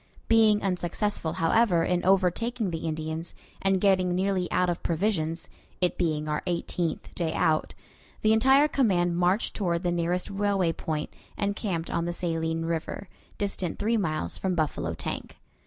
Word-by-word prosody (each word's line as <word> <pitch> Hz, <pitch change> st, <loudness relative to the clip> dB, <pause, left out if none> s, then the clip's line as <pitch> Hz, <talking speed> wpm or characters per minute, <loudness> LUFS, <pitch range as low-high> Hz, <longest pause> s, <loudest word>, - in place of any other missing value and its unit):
Being 220 Hz, -2 st, +4 dB
unsuccessful, 180 Hz, -1 st, -1 dB
however, 175 Hz, 0 st, +3 dB
in 180 Hz, -1 st, 0 dB
overtaking 195 Hz, +3 st, +1 dB
the 165 Hz, 0 st, -3 dB
Indians, 160 Hz, +1 st, -4 dB, 0.3 s
and 195 Hz, -1 st, +2 dB
getting 185 Hz, -2 st, +3 dB
nearly 185 Hz, -1 st, 0 dB
out 180 Hz, 0 st, +2 dB
of 175 Hz, -1 st, -2 dB
provisions 165 Hz, -2 st, -1 dB, 0.3 s
it 180 Hz, -1 st, +1 dB
being 155 Hz, -3 st, -1 dB
our 150 Hz, 0 st, -1 dB
eighteenth 175 Hz, -1 st, -2 dB
day 165 Hz, -2 st, -2 dB
out 155 Hz, -1 st, +1 dB, 0.5 s
the 215 Hz, 0 st, +5 dB
entire 265 Hz, +6 st, +5 dB
command 185 Hz, -, +2 dB
marched 180 Hz, +5 st, +1 dB
toward 175 Hz, -3 st, 0 dB
the 175 Hz, -, +1 dB
nearest 175 Hz, +3 st, -1 dB
railway 195 Hz, -4 st, +1 dB
point, 155 Hz, -1 st, -4 dB, 0.2 s
and 200 Hz, 0 st, 0 dB
camped 175 Hz, -7 st, -3 dB
on 170 Hz, 0 st, 0 dB
the 175 Hz, -, -2 dB
Saline 165 Hz, -1 st, -1 dB
River, 165 Hz, +4 st, -3 dB, 0.3 s
distant 195 Hz, -4 st, -2 dB
three 225 Hz, +3 st, +1 dB
miles 155 Hz, -, -2 dB
from 185 Hz, -2 st, 0 dB
Buffalo 155 Hz, -3 st, -1 dB
Tank. -, -, -5 dB
180 Hz, 155 wpm, -27 LUFS, 165-200 Hz, 0.5 s, the